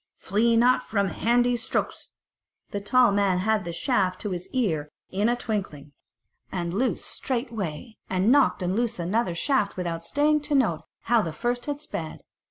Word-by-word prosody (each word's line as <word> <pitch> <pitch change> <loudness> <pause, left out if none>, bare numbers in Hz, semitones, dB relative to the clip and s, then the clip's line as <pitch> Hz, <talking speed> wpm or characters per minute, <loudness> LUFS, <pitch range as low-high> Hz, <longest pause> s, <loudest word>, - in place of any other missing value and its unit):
flee 230 +4 +2
not 245 +2 +4
from 200 -3 0
handy 240 +4 +2
strokes." 230 - -3 0.6
The 200 - -3
tall 245 +3 +4
man 200 -2 +2
had 210 +1 +1
the 170 - -3
shaft 185 -1 0
to 205 - -3
his 180 0 -4
ear 165 - -1 0.2
in 205 +4 +1
a 240 - +2
twinkling, 190 - -4 0.6
and 175 -2 -3
loosed 250 +7 0
straightway, 230 - -4
and 190 +5 +2
nocked 275 -8 +4
and 180 +2 0
loosed 235 0 0
another 180 +2 0
shaft 210 -1 0
without 170 -2 -3
staying 300 - +2
to 295 0 -1
note 215 - +2 0.2
how 235 -1 +3
the 165 - -3
first 240 - -2
had 290 0 -3
sped. 160 - -6
215 Hz, 170 wpm, -26 LUFS, 185-245 Hz, 0.6 s, not